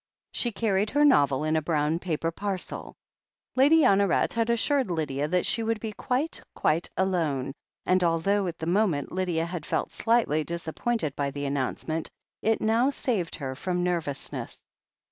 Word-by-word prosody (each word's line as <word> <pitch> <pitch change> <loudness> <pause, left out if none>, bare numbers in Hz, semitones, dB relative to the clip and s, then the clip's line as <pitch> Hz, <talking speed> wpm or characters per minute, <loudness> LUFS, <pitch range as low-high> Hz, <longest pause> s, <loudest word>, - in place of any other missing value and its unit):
She 240 - 0
carried 205 -1 +1
her 290 +4 +3
novel 145 - +4
in 155 +1 +1
a 160 - +2
brown 155 +1 0
paper 165 -2 -2
parcel. 195 +1 -4 0.6
Lady 290 +5 +6
Honoret 195 - +3
had 230 -1 0
assured 255 +1 +2
Lydia 150 -4 -1
that 180 +2 +1
she 230 - +1
would 225 -1 -1
be 220 0 -4
quite, 260 +9 -1
quite 165 +3 +1
alone, 160 -9 0 0.3
and 185 0 +3
although 180 +4 +2
at 170 -1 -4
the 160 - -5
moment 175 -5 +1
Lydia 175 -3 0
had 170 -2 -5
felt - - -2
slightly 225 -10 +2
disappointed 170 - -2
by 140 -1 -1
the 140 +1 -5
annoimcement, 140 +4 -2 0.3
it 225 0 +1
now 230 +4 +3
saved 220 -11 -2
her 135 -2 -4
from 175 +6 -2
nervousness. 165 -6 -3
175 Hz, 160 wpm, -27 LUFS, 155-220 Hz, 0.6 s, Lady